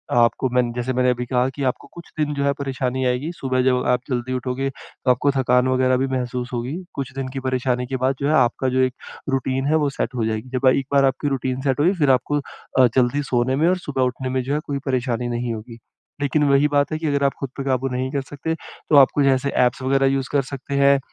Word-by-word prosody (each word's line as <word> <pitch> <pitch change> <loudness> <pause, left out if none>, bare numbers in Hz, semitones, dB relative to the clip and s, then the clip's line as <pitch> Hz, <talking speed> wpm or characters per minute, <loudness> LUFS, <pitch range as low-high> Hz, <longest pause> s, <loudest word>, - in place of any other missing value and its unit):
आपको 120 +2 +3
मैंने 125 -1 +2
जैसे 125 +1 -2
मैंने 125 0 +2
अभी 125 0 -3
कहा 125 +1 +1
कि 140 - -3
आपको - - -7
कुछ 170 -1 -12
दिन 150 -1 0
जो 140 - -2
है, 140 - +3
परेशानी 130 -1 -2
आएगी। 125 +6 0
सुबह 130 -1 0
जब 125 -1 +2
आप 125 - 0
जल्दी 125 0 -2
उठोगे, 130 +2 -2
तो 130 -1 -3
आपको 140 +3 +2
थकान 125 -2 +2
वगैरह 130 0 +2
भी 135 - 0
महसूस 125 -1 -3
होगी। 125 +4 -3 0.2
कुछ 135 -2 -4
दिन 135 -1 -3
की 135 - -3
परेशानी 125 -1 0
के 130 0 -2
बाद, 135 +1 +2
जो 140 - +1
है, 155 - +2
आपका 130 0 +2
जो - - +3
एक 130 -1 +1 0.4
रूटीन 135 0 -1
है, 155 - +3
वो 150 -2 +2
सेट 125 - -2
हो 115 -3 0
जाएगी। 110 +3 -3
जब 130 +1 +1
एक 130 +1 +3
बार 140 -1 +5
आपकी 135 +2 0
रूटीन 130 -1 -2
सेट 135 -1 0
होगी, 175 +6 +4
फिर 140 -3 +4
आपको, 145 +3 +1 0.4
अ, 125 - +7
जल्दी 130 +3 +2
सोने 125 +1 +2
में 155 +4 +2
और 185 - +2
सुबह 135 -2 -1
उठने 130 +1 -2
में, 130 0 0
जो 135 +3 -2
है, 150 - +1
कोई 140 -1 -3
परेशानी 125 -2 -1
नहीं 120 0 -2
होगी। 115 +1 -8 0.4
लेकिन 145 +2 +1
वही 140 +2 +4
बात 145 - +2
है 155 - -2
कि 160 - -2
अगर 140 -1 +1
आप 140 - +2
खुद 135 - -4
पे 135 - -3
काबू 135 0 0
नहीं 130 +1 -2
कर 140 -2 -1
सकते, 155 +3 -3
तो 155 - -4
आप 135 - +7
कोई 140 -1 +3
ऐसे 140 +2 -2 0.2
ऐप्स 125 - -5
वगैरह 135 +1 +2
यूज़ 135 -2 -2
कर 145 - +3
सकते 140 +1 -5
हैं। 140 0 +5
130 Hz, 255 wpm, -22 LUFS, 125-140 Hz, 0.4 s, अ